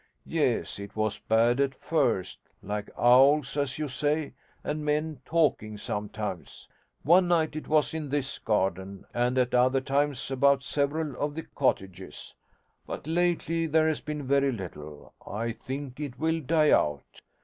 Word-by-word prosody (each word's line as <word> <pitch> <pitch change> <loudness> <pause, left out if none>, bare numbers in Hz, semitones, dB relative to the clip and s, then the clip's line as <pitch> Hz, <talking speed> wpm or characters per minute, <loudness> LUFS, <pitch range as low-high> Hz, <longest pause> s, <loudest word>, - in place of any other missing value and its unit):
Yes, - - 0
it 100 +1 -9
was 110 -1 -1
bad 115 +3 +2
at 140 -1 +1
first: 120 - 0 0.2
like 105 +1 -4
owls, 135 +4 +5
as 140 -2 -1
you 155 0 -2
say, 145 +3 -1 0.3
and 150 +1 -3
men 150 -1 -1
talking 145 -10 +1
sometimes. 105 -2 -5 0.4
One 175 +4 +5
night 160 -3 +1
it 155 - -6
was 155 -1 +2
in 155 -3 -4
this 140 -1 -2
garden, 95 -2 -1
and 120 +1 +1
at 125 -1 +2
other 130 +2 +4
times 135 -1 -1
about 140 +1 +3
several 145 0 -1
of 145 0 -2
the 165 - -4
cottages. 95 -8 -3 0.5
But - - -6
lately 165 0 0
there 160 +1 +3
has 155 -2 0
been 150 -1 -5
very 140 +1 +3
little: 75 - -8
I 115 +3 -2
think 130 +3 -7
it 140 -4 -5
will 160 +2 0
die 155 +1 +3
out. 75 -2 0
135 Hz, 150 wpm, -28 LUFS, 110-150 Hz, 0.5 s, owls